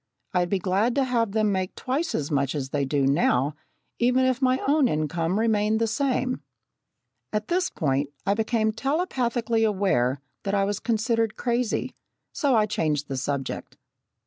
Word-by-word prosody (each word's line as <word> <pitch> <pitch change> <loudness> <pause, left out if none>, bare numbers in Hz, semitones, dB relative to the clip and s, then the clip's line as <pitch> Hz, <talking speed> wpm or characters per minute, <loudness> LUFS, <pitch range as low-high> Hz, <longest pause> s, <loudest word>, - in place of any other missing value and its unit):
I'd 180 -1 +1
be 195 - +2
glad 195 +6 +1
to 280 - +3
have 230 -5 0
them 215 -1 +2
make 185 -1 -2
twice 275 +6 -2
as 150 0 -2
much 140 0 0
as 135 -2 -3
they 140 0 0
do 140 0 +1
now, 140 -1 +2 0.5
even 250 +2 +3
if 255 0 +1
my 260 0 +3
own 290 -1 +4
income 165 +4 0
remained 220 -1 +2
the 230 - +2
same." 255 +2 0 0.9
At 210 0 -2
this 360 +1 +1
point, 140 -3 0 0.2
I 200 - +3
became 220 0 +1
telepathically 240 -4 0
aware 185 - +1 0.2
that 200 0 -1
I 195 -1 +2
was 205 0 -2
considered 225 -1 0
crazy, 240 -1 -1 0.4
so 280 -5 +2
I 215 -1 +4
changed 150 -8 -1
the 135 - -2
subject. 140 0 -4
215 Hz, 165 wpm, -25 LUFS, 155-245 Hz, 0.9 s, own